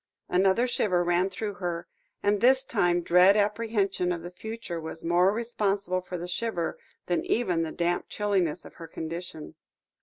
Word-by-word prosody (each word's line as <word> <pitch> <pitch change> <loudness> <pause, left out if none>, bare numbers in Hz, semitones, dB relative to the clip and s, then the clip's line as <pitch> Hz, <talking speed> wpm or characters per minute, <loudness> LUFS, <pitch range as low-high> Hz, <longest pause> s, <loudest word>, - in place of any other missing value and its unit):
Another 190 +6 +3
shiver 185 -7 +1
ran 175 +2 +2
through 205 +2 -4
her, 175 -1 -2 0.4
and 205 0 +2
this 260 +2 +5
time 175 -7 +1
dread 180 +4 +6
apprehension 205 -3 0
of 170 -2 -3
the 175 - -7
future 205 -3 -6
was 160 0 -7
more 175 +3 +4
responsible 200 -5 -1
for 180 0 -6
the 175 +1 -5
shiver 180 -2 -2 0.3
than 175 - 0
even 185 -8 +1
the 160 -1 -2
damp 175 0 -1
chilliness 190 -6 0
of - - -12
her 165 - -7
condition. 160 0 -6
185 Hz, 160 wpm, -27 LUFS, 175-210 Hz, 0.4 s, dread